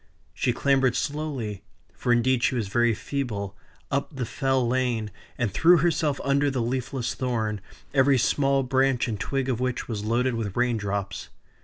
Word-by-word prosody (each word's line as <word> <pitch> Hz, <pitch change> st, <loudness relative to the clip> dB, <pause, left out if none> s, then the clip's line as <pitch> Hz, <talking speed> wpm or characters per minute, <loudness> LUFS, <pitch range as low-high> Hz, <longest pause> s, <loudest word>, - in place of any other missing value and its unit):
She 125 Hz, -, +1 dB
clambered 135 Hz, 0 st, +2 dB
slowly 140 Hz, -10 st, -3 dB, 0.3 s
(for 120 Hz, -, -1 dB
indeed 120 Hz, +1 st, +3 dB
she 130 Hz, -, +2 dB
was 110 Hz, -5 st, -2 dB
very 120 Hz, +1 st, +2 dB
feeble) 105 Hz, -8 st, -4 dB, 0.4 s
up 140 Hz, +2 st, -1 dB
the 130 Hz, -2 st, -2 dB
Fell 130 Hz, -1 st, 0 dB
Lane, 120 Hz, -4 st, 0 dB, 0.3 s
and 115 Hz, -6 st, -1 dB
threw 175 Hz, +7 st, +6 dB
herself 155 Hz, -3 st, +1 dB
under 140 Hz, +1 st, +2 dB
the 135 Hz, -2 st, -2 dB
leafless 120 Hz, 0 st, -2 dB
thorn, 110 Hz, -5 st, -2 dB, 0.3 s
every 135 Hz, 0 st, +4 dB
small 135 Hz, +2 st, +2 dB
branch 130 Hz, -1 st, +2 dB
and 110 Hz, -4 st, -3 dB
twig 135 Hz, +2 st, -1 dB
of 125 Hz, -3 st, -1 dB
which 125 Hz, -1 st, -2 dB
was 105 Hz, -3 st, -4 dB
loaded 120 Hz, +4 st, +1 dB
with 110 Hz, -3 st, -3 dB
rain 125 Hz, -1 st, +2 dB
drops. 100 Hz, -2 st, -3 dB
125 Hz, 165 wpm, -26 LUFS, 115-135 Hz, 0.4 s, threw